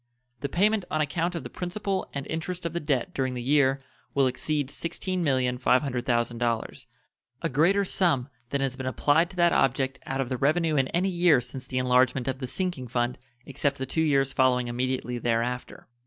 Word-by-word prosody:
The 140 - -3
payment 205 +5 +2
on 155 - -1
account 165 +4 -1
of 170 - -4
the - - -7
principal 190 +1 -3
and 140 -1 -4
interest 170 +2 -4
of 170 - -2
the 170 - -1
debt 140 -6 -1
during 130 -1 -1
the 125 - -3
year 135 0 +3 0.3
will 140 -1 +4
exceed 140 +2 -1
$16,500,000, 125 - 0 0.6
a 165 - +1
greater 175 +9 +3
sum 165 -10 +2 0.2
than 140 +2 -1
has 135 -2 -1
been 130 -1 -5
applied 150 +6 +2
to 195 - -12
that 175 -1 +4
object 135 0 +1
out 135 0 -2
of 130 -2 -1
the 130 - -2
revenue 155 +4 +2
in 135 -2 +2
any 180 +6 0
year 175 -6 +4
since 125 +1 -7
the 130 - -3
enlargement 125 0 +2
of 130 0 -2
the 130 - -4
sinking 175 -4 -2
fund 120 +1 -1 0.3
except 140 +1 -1
the 130 - -3
two 145 +5 -1
years 135 -3 +2
following 125 -2 +3
immediately 125 0 -2
there 115 -1 +1
after. 125 +1 -6
135 Hz, 185 wpm, -27 LUFS, 125-165 Hz, 0.6 s, will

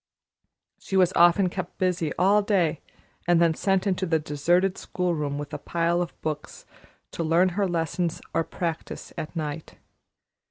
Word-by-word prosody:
She 195 - -2
was 185 -1 +4
often 175 +3 +5
kept 180 0 -5
busy 180 -4 0
all 200 +4 +4
day 185 -7 +1 0.5
and 175 -1 +4
then 170 -1 +4
sent 195 +3 +1
into 190 -1 0
the 165 -1 +3
deserted 170 +5 +1
school 180 -1 -1
room 145 -3 -2
with 145 0 -6
a - - -4
pile 170 +1 0
of 175 - -5
books 155 -1 -5 0.5
to 170 - -3
learn 170 +3 +3
her 195 +2 0
lessons 170 0 -1
or 165 - +2
practise 165 0 -5
at 155 - -6
night. 155 -1 -5
170 Hz, 160 wpm, -26 LUFS, 160-185 Hz, 0.5 s, often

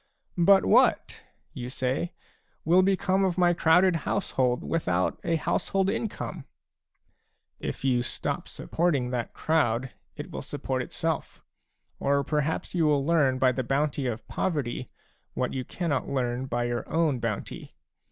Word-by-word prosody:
" - - -42
But 195 -1 +7
what," - - +3 0.3
you 120 - -6
say, 130 +6 -2 0.2
" - - -42
will 175 +4 +5
become 195 0 +2
of 185 -2 0
my 175 -1 +4
crowded 175 +2 +4
household 130 -7 0
without 90 - 0
a 170 -1 +1
household 195 +4 0
income? 205 -8 -4 0.6
" - - -47
If - - -6
you 125 -2 +3
stop 120 - -3
supporting 145 -8 -1
that 120 -2 -3
crowd, 130 -6 +1 0.2
it - - -7
will - - -5
support - - -3
itself; - - -3 0.6
or 140 0 +2
perhaps 150 +4 -1
you 165 -3 +2
will 145 -2 +2
learn 145 -5 +3
by 130 0 +4
the 130 - -2
bounty 140 +1 0
of 115 -2 -4
poverty 140 -9 -2 0.5
what - - -1
you 130 - -2
cannot 150 0 -2
learn 130 -1 -1
by 120 -1 -1
your 120 0 -3
own 160 -6 +2
bounty. 115 -3 -5
140 Hz, 150 wpm, -27 LUFS, 125-170 Hz, 0.6 s, But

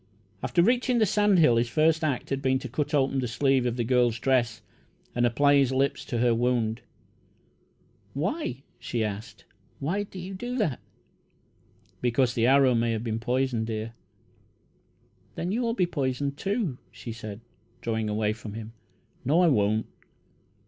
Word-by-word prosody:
After 170 - +2
reaching 245 +3 +2
the 220 - +4
sand 205 -1 +3
hill, 135 -9 +5
his 120 +1 +1
first 155 +4 +2
act 140 -4 -1
had 135 0 -1
been 130 -1 +2
to 130 - -6
cut 145 +4 -2
open 135 -1 +2
the 125 - -1
sleeve 130 +1 +2
of 120 - -1
the 120 - 0
girl's 120 -1 +2
dress 120 -2 +1 0.5
and 120 0 +2
apply 140 +4 +4
his 135 -2 +3
lips 135 +1 0
to 120 - -3
her 120 0 +3
wound. 115 -1 0 1.3
"Why?" 155 - -2 0.2
she 120 -1 -2
asked. 105 +1 -6 0.3
"Why 170 +9 -1
do 195 -2 -8
you 185 +2 -6
do 245 +6 -4
that?" 165 - 0 1.2
"Because 120 0 +2
the 115 0 +2
arrow 135 -1 +5
may 115 0 +1
have 110 0 -3
been 115 -1 -2
poisoned, 125 -1 0
dear." 110 0 -4 1.4
"Then 175 +2 -2
you'll 230 +1 0
be 185 - +2
poisoned, 140 -3 -2
too," 195 - -2
she 120 - -8
said, 110 -2 -7 0.4
drawing 110 -2 -2
away 105 0 0
from 110 -1 -9
him. 110 0 -7 0.5
"No, 155 +7 +3
I 175 - +5
won't." 110 -3 +2
130 Hz, 160 wpm, -27 LUFS, 115-155 Hz, 1.4 s, hill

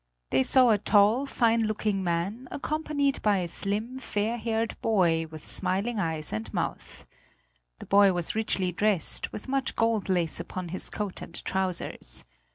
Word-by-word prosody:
They 130 - +4
saw 250 - +5
a 210 - +3
tall, 215 +6 +4
fine 230 -3 +2
looking 210 -2 -1
man 185 +8 -2
accompanied 290 -2 -1
by 210 -2 +3
a 180 -2 -1
slim, 215 +8 -2
fair 225 -1 -1
haired 225 0 -1
boy 170 -7 +2
with 155 -1 -10
smiling 210 +5 +1
eyes 160 - -2
and 110 -1 -4
mouth. - - -4 0.7
The - - -10
boy 200 0 +5
was 175 -2 -2
richly 205 -4 0
dressed, 200 -2 +1
with 210 - -8
much 270 0 -1
gold 225 -3 +1
lace 175 -3 0
upon 185 -2 -5
his 185 - -3
coat 205 -3 -4
and 170 - -9
trousers. 190 -2 -3
205 Hz, 160 wpm, -27 LUFS, 180-230 Hz, 0.7 s, saw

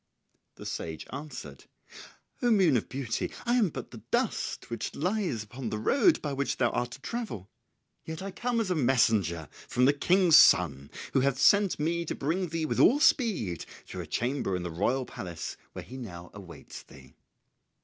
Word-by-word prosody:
The - - -11
sage 80 -2 -5
answered, 125 - -8 0.8
"O 245 - +2
moon 190 - +4
of 120 - -1
beauty, 130 -4 -3
I 240 - +1
am 230 -7 +3
but - - -8
the - - -10
dust - - -1
which 115 - -4
lies 180 - -1
upon 120 +3 -6
the 110 - -3
road 280 - +3
by 145 -2 -2
which 140 0 -1
thou 120 -2 +2
art 120 0 -1
to 135 - -11
travel. 185 - -5 0.5
Yet 160 0 -6
I 195 - -5
come 240 +3 -1
as 210 -5 -1
a - - +2
messenger 110 - +2 0.2
from 125 - +2
the 140 - +5
King's 175 +2 +5
son 70 - +5 0.2
who - - +4
hath 135 0 +1
sent 200 +6 +4
me 170 +3 0
to - - -3
bring 175 +6 -1
thee 165 0 -2
with - - -2
all 280 - +6
speed 190 - +1 0.2
to - - -5
a - - -8
chamber 120 -5 -1
in 90 - -3
the 90 - -4
royal 125 +10 0
palace 85 -7 -6 0.2
where - - -7
he 130 - -9
now 85 -8 -9
awaits 95 -4 -11
thee." 65 0 -16
135 Hz, 185 wpm, -29 LUFS, -, 0.8 s, all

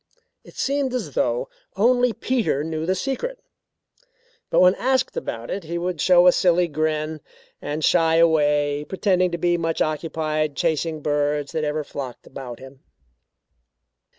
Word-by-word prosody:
It - - -16
seemed 275 -2 -1
as 250 - -4
though - - 0 0.3
only 245 +3 +3
Peter 225 - -1
knew 160 0 -3
the 185 - +2
secret 280 - -3 1.1
but - - +3
when 180 0 +6
asked 260 +3 0
about 115 0 -5
it 190 -3 -4
he 170 +2 -4
would 175 -2 -3
show 180 -1 +5
a 180 - +8
silly 175 0 +3
grin 155 0 -2 0.4
and 150 +1 -2
shy 165 -2 +3
away, 150 -3 +3
pretending 185 +1 +1
to 170 - -3
be 175 0 +1
much 165 -1 -2
occupied 155 -1 -1
chasing 165 0 0
the 155 - -10
birds 145 -1 0
that 160 -2 -2
ever 150 0 -1
flocked 135 -3 -7
about 125 -3 -8
him. 135 0 -13
160 Hz, 150 wpm, -23 LUFS, 150-185 Hz, 1.1 s, a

